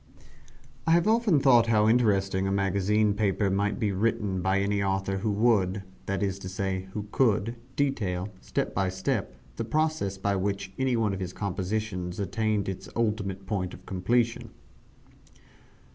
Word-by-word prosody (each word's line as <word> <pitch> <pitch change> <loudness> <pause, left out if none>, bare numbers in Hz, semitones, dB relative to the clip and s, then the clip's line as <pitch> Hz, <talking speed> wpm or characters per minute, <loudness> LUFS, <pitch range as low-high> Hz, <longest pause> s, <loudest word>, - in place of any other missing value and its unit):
I 165 - +5
have 170 +3 +4
often 220 -8 +4
thought 120 -4 +5
how 110 -2 +4
interesting 100 -5 +2
a - - 0
magazine 100 +2 +2
paper 100 -1 +1
might 100 +2 0
be 105 -4 +1
written 100 -2 0
by 95 +2 +2
any 100 0 0
author 95 0 0
who 105 +3 -1
would 100 -3 +2 0.2
that 100 +1 -1
is 95 -1 -1
to 95 - -6
say, 95 0 -3
who 105 -1 -4
could 115 -2 +2 0.2
detail, 105 -9 -1
step - - -2
by 95 0 +1
step, 95 - -2 0.2
the 115 - -1
processes 150 -6 0
by 100 +1 0
which 95 0 -2
any 130 -2 +2
one 110 -3 +1
of 95 - -4
his 90 -1 -4
compositions 95 -2 -3
attained 105 +2 0
its 95 -1 -5
ultimate 100 -4 -1
point 95 -3 -2
of - - -17
completion. 115 +5 0
100 Hz, 160 wpm, -27 LUFS, 95-110 Hz, 0.2 s, I